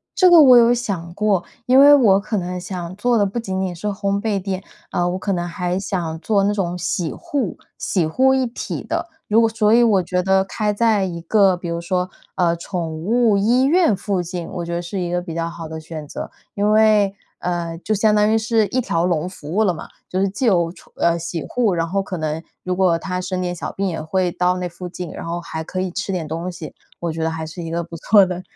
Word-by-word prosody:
这 370 - +5
这 - - +7
个 340 -3 +9
我 255 -3 +8
有 235 0 +6
想 190 -8 -3
过。 205 -3 +1 0.2
因 255 +2 +5
为 290 +1 +9
我 215 -9 +5
可 210 +1 -3
能 180 0 -3
想 180 -1 -6
做 240 +3 +1
的 205 - +3
不 200 +4 -4
仅 190 -4 -3
仅 185 -2 -2
是 195 +5 -5
烘 200 0 -1
焙 205 -4 -1
店， 190 0 -4 0.3
呃 175 0 +1
我 185 - -3
可 200 - -2
能 175 -1 -2
还 180 +1 -2
想 170 -5 -3
做 200 +2 +1
那 205 +1 +2
种 180 -3 -2
洗 175 -1 -2
护 265 -10 -3 0.2
洗 180 -5 0
护 265 +10 +3
一 260 -1 +2
体 235 - -5
的。 - - -3 0.2
如 225 +2 +4
果 225 - +3
所 220 -1 +2
以 240 +1 +6
我 205 -5 +4
觉 180 +1 -1
得 190 0 +3
开 210 +1 -1
在 215 -2 +2
一 175 -2 -3
个 190 0 +3
比 175 - -7
如 170 0 -3
说 180 +1 -1 0.3
呃 170 -2 +2
宠 170 -1 -4
物 225 0 +3
医 240 +6 +3
院 330 - +4
附 190 -2 -1
近 175 -1 -5
我 175 - -5
觉 170 - -4
得 170 - -1
是 180 +3 -5
一 175 0 -2
个 175 0 0
比 170 -2 -7
较 165 0 -2
好 165 -1 -8
的 160 0 -6
选 155 -2 -8
择， - - -7 0.2
因 205 +1 +1
为， 215 -2 +4 0.3
呃 170 -2 -3
就 215 - 0
相 210 +1 +3
当 210 +1 +3
于 225 - +4
是 220 -1 +2
一 255 - -1
条 170 -6 0
龙 175 -1 0
服 155 -4 -9
务 215 +3 +3
了 185 -4 +2
嘛。 160 - -8 0.2
就 185 - -1
是 195 - +2
既 250 +7 -3
有 170 -6 +3
宠 - - -18
呃 170 0 +1
洗 170 -1 -4
护， 230 -6 +1
然 165 0 0
后 195 +3 0
可 190 -2 -5
能 155 0 -2 0.2
如 185 0 -1
果 180 -3 +3
它 180 +2 -4
生 185 0 -3
点 180 -1 -2
小 175 - -5
病， 195 0 -1
也 165 -3 -3
会 180 +3 0
到 180 +1 +1
那 180 -1 -2
附 180 +1 -8
近， 180 -2 -6
然 - - -7
后 170 +1 -2
还 160 -1 -5
可 185 +3 -4
以 185 -1 -2
吃 195 +1 -3
点 175 -3 -2
东 165 +3 -4
西， 165 -3 -8 0.3
我 170 -1 -2
觉 160 0 -5
得 160 - +1
还 160 0 -4
是 160 +2 -8
一 165 - -5
个 170 +1 -2
不 165 0 -9
错 200 +4 +5
的 180 0 -4
185 Hz, 275 characters per minute, -20 LUFS, 170-210 Hz, 0.3 s, 个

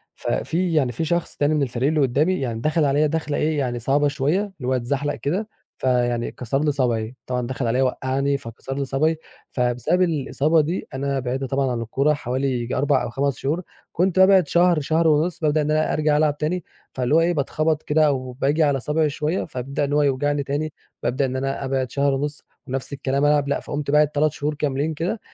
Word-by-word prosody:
ف - - -9
في 175 +1 0
يعني 140 -6 +2
في 160 +8 -3
شخص 170 +2 -1
تاني 145 +1 +2
من 150 -2 +2
الفريق 125 0 -1
اللي 155 0 +1
قدّامي 145 +7 +2
يعني 120 -4 -3
دخل 155 +3 +2
عليَّ 145 +2 +3
دَخلة 150 -1 -2
إيه 155 0 0
يعني 125 -3 -1
صعبة 140 +5 +2
شويّة، 145 +5 +1
اللي 190 -11 -7
هو 130 - +2
اتزحلق 140 +4 -1
كده، 190 +9 -2 0.3
فيعني 120 -2 0
كسر 135 +4 -2
لي 150 - +2
صابعي. 120 -4 -1
طبعًا 125 -1 -2
دخل 130 -1 -2
عليَّ 125 +3 +1
وقعني 135 +2 0
فكسر 125 +1 -7
لي 140 - -1
صابعي، 155 +5 +1 0.3
فبسبب 125 +8 +1
الإصابة 155 -1 +2
دي 165 +5 -3
أنا 135 +1 -1
بعدت 130 +1 -3
طبعًا 135 0 0
عن 120 -1 -2
الكورة 135 +6 +1
حوالي 130 -1 -2
ييجي 120 -1 -2
4 140 - +2
أو - - -3
5 135 +1 -1
شهور. 155 +6 -1 0.3
كنت 185 +1 +1
بابعد 190 -3 +6
شهر 175 +1 +3
شهر 160 +3 +1
ونص، 160 +3 +2
بابدأ 155 -1 +2
إن 150 0 0
أنا 155 0 +1
أرجع 150 -1 +2
ألعب 150 -1 +2
تاني. 170 +4 -2 0.3
فاللي 130 +3 +1
هو - - +6
إيه 170 +1 +2
بتخبط 155 +1 0
كده، 155 +1 +3
أو 130 -3 -1
باجي 140 +5 +1
على 140 -2 +2
صابعي 150 +4 +1
شويّة 155 +5 -1
فبيبدأ 140 0 -4
إن 145 0 -1
هو 150 - +3
يوجعني 145 +1 +1
تاني، 145 +2 -3 0.3
بابدأ 130 +3 +1
إن 130 0 -3
أنا 135 +1 -2
أبعد 130 -2 -1
شهر 140 0 +1
ونص، 145 +2 -2 0.2
ونفس 135 +2 -4
الكلام 140 +1 0
ألعب 145 -1 +3
لأ، 140 - 0
فقمت 145 -1 -4
باعد 150 0 +5
3 150 +1 +1
شهور 150 +1 -2
كاملين 150 +1 -1
كده، 170 +8 -2
145 Hz, 210 wpm, -22 LUFS, 130-155 Hz, 0.3 s, بابعد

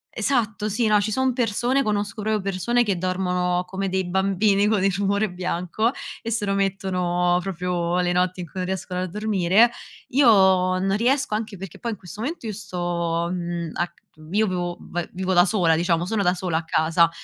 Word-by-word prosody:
esatto, 220 -5 0
sì, 225 +3 0
no, 210 -1 +4
ci 210 +1 -2
sono 260 +3 +1
persone 245 +2 +1
conosco 205 -2 -2
proprio 215 0 0
persone 200 +6 +1
che 200 -5 -1
dormono 180 -1 0
come 195 +1 -3
dei 190 0 -1
bambini 195 +2 +2
con 210 -3 +2
il 195 -1 +2
rumore 200 +1 0
bianco 180 +5 -1 0.3
e 230 - -5
se 225 -2 -1
lo 195 - 0
mettono 180 -3 0
proprio 180 -1 -1
le 180 0 +1
notti 180 +1 0
in - - -5
cui 185 - -8
non 180 - -1
riescono 185 -1 -3
a 185 - -2
dormire. 210 +2 +3 0.4
Io 275 +1 +4
non 190 -2 +4
riesco, 265 +2 +1
anche 215 -1 -3
perché 190 -2 -9
poi 235 - -3
in 215 - -5
questo 185 +3 -10
momento 285 +2 -4
io 215 - -3
sto, 175 -3 -2
mhmm, 170 -2 -3
a 175 - -1
c - - -29 0.3
io 215 +3 +3
vio 175 -2 -2
va 175 -1 -5
vivo 185 +1 -2
da 175 -1 +6
sola, 175 -5 +2
diciamo, 170 0 +1
sono 210 +2 -1
da 180 -1 +2
sola 175 -3 -1
a 165 - -2
casa 165 +1 +3
190 Hz, 200 wpm, -23 LUFS, 180-210 Hz, 0.4 s, da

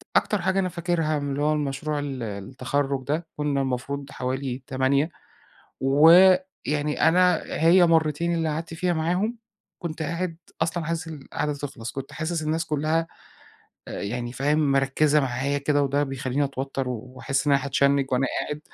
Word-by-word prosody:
أكتر 210 -3 +2
حاجة 190 +2 +1
أنا 185 -1 0
فاكرها 170 -3 -1
من 145 0 -3
اللي 140 +1 -2
هو 150 +1 +3
المشروع 150 +1 -2
ال 135 -4 -4
التَخرُّج 130 +6 -2
ده، 160 +4 -1
كنا 145 -2 0
المفروض 135 +2 -3
حوالي 130 0 -3
8 140 +3 +1 0.7
ويعني 160 +1 +4
أنا 180 +1 +4
هي 175 +2 +4
مرتين 165 +1 +2
اللي 165 -1 0
قعدت 160 +2 -4
فيها 175 +2 0
معاهم، 180 +8 0 0.4
كنت 165 -2 -5
قاعد 170 +2 -3 0.3
أصلًا 165 0 -1
عايز 165 0 -3
القاعدة 150 -1 -4
دي 145 - -8
تخلص، 135 -5 -6
كنت 135 0 -7
حاسس 160 +1 -2
الناس 160 +2 -1
كلها 155 +2 0 0.8
أ - - -8
يعني 120 +3 -3
فاهم؟ 145 +2 +1
مركّزة 140 +3 +3
معايا 135 +2 -1
كده 145 0 +1
وده 140 +1 +1
بيخلّيني 135 0 -1
اتوتر. 135 -1 -3
و 125 +1 -6
واحس 135 +2 -1
إن 145 - +4
أنا 140 -1 +3
هاتشنّج 140 0 +2
وأنا 130 +1 +2
قاعد، 150 0 -4
145 Hz, 160 wpm, -25 LUFS, 135-165 Hz, 0.8 s, ويعني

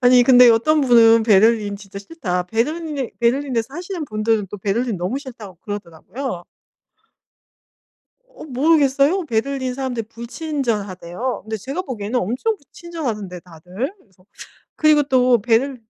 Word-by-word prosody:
아니 245 -1 +6
근데 250 -1 +7
어떤 295 +7 +3
분은 230 -3 +6
"베를린 215 -1 +3
진짜 200 -1 -10
싫다." 200 - -3
베를린에 285 - -2
베를린에서 240 -1 +1
사시는 350 -2 -5
분들은 215 -3 -1
또 205 - -7
"베를린 215 +3 -1
너무 190 +10 -2
싫다."고 225 - -11
그러더라고요. 205 - -6 1.9
어 - - -13
모르겠어요. 290 +4 +2
베를린 260 +1 -2
사람들이 250 -4 -4
불친절하대요. 230 - -4
근데 220 0 -4
제가 275 - -4
보기에는 245 - -3
엄청 255 - -1
그 - - -27
친절하던데 230 - -5
다들 180 - -6
그래서. 190 - -28 0.5
그리고 305 -1 +4
또 255 -3 +3
베를 240 +3 +1
240 Hz, 345 characters per minute, -20 LUFS, 210-275 Hz, 1.9 s, 근데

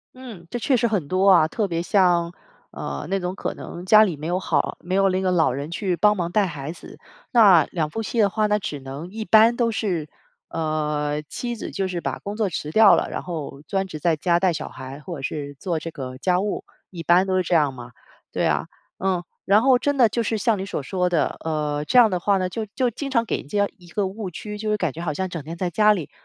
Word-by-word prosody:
嗯， 230 -10 -10
这 240 - -3
确 260 +1 +2
实 235 - +2
很 195 -10 -1
多 185 +3 +2
啊， 160 -4 +6
特 205 +5 -1
别 170 -1 -2
像 175 -3 +2 0.4
呃， - - -6
那 195 0 0
种 180 +1 -3
可 - - -4
能 175 - -8
家 215 +3 +7
里 180 -7 0
没 155 +3 -6
有 180 +2 0
好 155 -6 -1
没 180 +1 -6
有 195 0 +4
那 185 - 0
个 185 -1 0
老 165 -6 +3
人 140 +5 -5
去 185 0 -1
帮 210 +5 +4
忙 175 -2 -2
带 210 0 +3
孩 150 -3 -5
子。 - - -12 0.3
那 195 - +7
两 155 -4 -1
夫 225 +7 -4
妻 235 - -3
的 205 -2 +5
话， 215 +2 0
那 210 0 +2
只 145 -7 -5
能 135 +6 -8
一 220 +2 -6
般 225 +2 +6
都 235 -2 +1
是， 180 -9 -2 0.4
呃， 150 -2 -1
妻 240 +10 -5
子 - - -7
就 195 -2 -2
是 180 -2 -3
把 - - -4
工 205 +1 -6
作 215 -3 +1
辞 150 -3 -4
掉 215 +4 +7
了， - - -1
然 - - -5
后 150 -5 -6
专 195 -1 -1
职 155 -4 -7
在 165 +1 +2
家 170 +3 +1
带 185 -2 +2
小 - - -5
孩， 130 +2 -9
或 170 +3 -7
者 135 - -9
是 145 0 -4
做 170 -4 -2
这 165 - -6
个 130 -4 -7
家 180 +3 +2
务， 205 +1 -2 0.3
一 175 - -7
般 175 +3 +4
都 190 -1 0
是 185 - +3
这 175 0 0
样 145 -4 +3
嘛。 120 -1 -10 0.4
对 - - 0
啊， - - 0 0.3
嗯， 185 -2 0 0.2
然 205 +3 +4
后 260 -2 +5
真 285 0 0
的 240 - +6
就 235 - -1
是 225 0 -1
像 210 -1 +1
你 - - -3
所 150 - -4
说 180 +4 0
的， 165 -4 0
呃， 150 -2 -1
这 250 - +1
样 225 -4 +7
的 180 - 0
话 200 +2 +2
呢， 185 -1 0
就 220 +1 -4
就 255 -2 +2
经 275 +5 -5
常 235 -3 +1
给 - - -1
人 - - -10
家 205 +4 +1
一 175 - -16
个 200 +3 -1
误 195 0 -5
区， 210 +4 -7
就 215 - -3
是 210 - +1
感 170 -8 -1
觉 165 - -7
好 170 -3 -1
像 190 +5 -2
整 170 -4 -6
天 165 +3 -7
在 180 0 -2
家 210 +4 +4
里， 175 -8 -2
185 Hz, 280 characters per minute, -23 LUFS, 160-210 Hz, 0.4 s, 家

